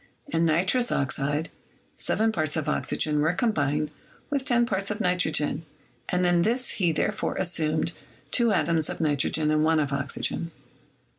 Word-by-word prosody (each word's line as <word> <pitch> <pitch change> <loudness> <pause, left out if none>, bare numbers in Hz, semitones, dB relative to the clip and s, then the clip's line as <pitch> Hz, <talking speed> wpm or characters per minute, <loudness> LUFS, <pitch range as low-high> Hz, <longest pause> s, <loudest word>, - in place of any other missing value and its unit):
In 165 - +1
nitrous 185 +10 +2
oxide, 145 +3 0 0.4
7 220 +1 +1
parts 155 -6 -1
of 155 -2 -2
oxygen 150 0 0
were 155 +3 +2
combined 150 - 0 0.4
with 280 -2 -1
10 240 -3 +3
parts 195 -3 -2
of 210 +1 -3
nitrogen, 180 -5 0 0.5
and 180 0 +1
in 175 -1 +3
this 240 +7 +1
he 175 -4 +1
therefore 155 - -1
assumed 160 -4 0 0.4
two 235 -3 +3
atoms 165 -5 +1
of - - -5
nitrogen 150 0 +1
and 155 0 +2
one 160 0 +3
of 145 -2 -1
oxygen. 140 +4 -2
165 Hz, 150 wpm, -26 LUFS, 150-195 Hz, 0.5 s, 10